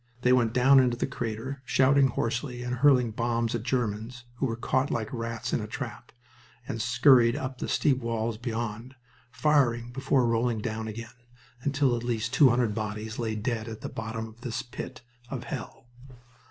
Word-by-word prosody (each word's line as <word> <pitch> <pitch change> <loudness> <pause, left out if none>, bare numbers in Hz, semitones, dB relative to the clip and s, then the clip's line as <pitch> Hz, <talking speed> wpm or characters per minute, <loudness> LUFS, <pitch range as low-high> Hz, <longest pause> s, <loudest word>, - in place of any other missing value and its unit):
They 125 - +5
went 120 -3 +3
down 130 +3 +6
into 125 -2 +2
the - - 0
crater, 120 +4 -4
shouting 135 +2 +4
hoarsely, 125 +1 -2
and 125 0 -3
hurling 125 -3 +4
bombs 115 0 -1
at 120 - -1
Germans, 120 -1 -2
who 135 - 0
were 115 - -2
caught 130 +3 0
like 110 0 -2
rats 115 -1 -4
in - - +1
a - - -5
trap, - - -7 0.6
and 115 - -3
scurried 125 -1 +5
up 130 -1 -4
the - - -3
steep 135 -3 +2
sides 115 -1 -2
beyond, 115 +1 -4 0.3
firing 120 -5 +2
before 135 0 +1
rolling 115 0 +1
down 110 0 -3
again, 115 +1 -7 0.5
until 140 -2 +2
at 120 - -4
least 115 0 -2
two 135 +1 +7
hundred 120 -3 +2
bodies 110 +1 -4
lay 110 -2 -1
dead 110 +1 -2
at 110 -1 -7
the - - -5
bottom 110 0 -5
of 110 +1 -16
this 120 -3 -3
pit 120 - -8 0.3
of 130 -3 -4
hell. 125 - -7
120 Hz, 180 wpm, -28 LUFS, 115-130 Hz, 0.6 s, two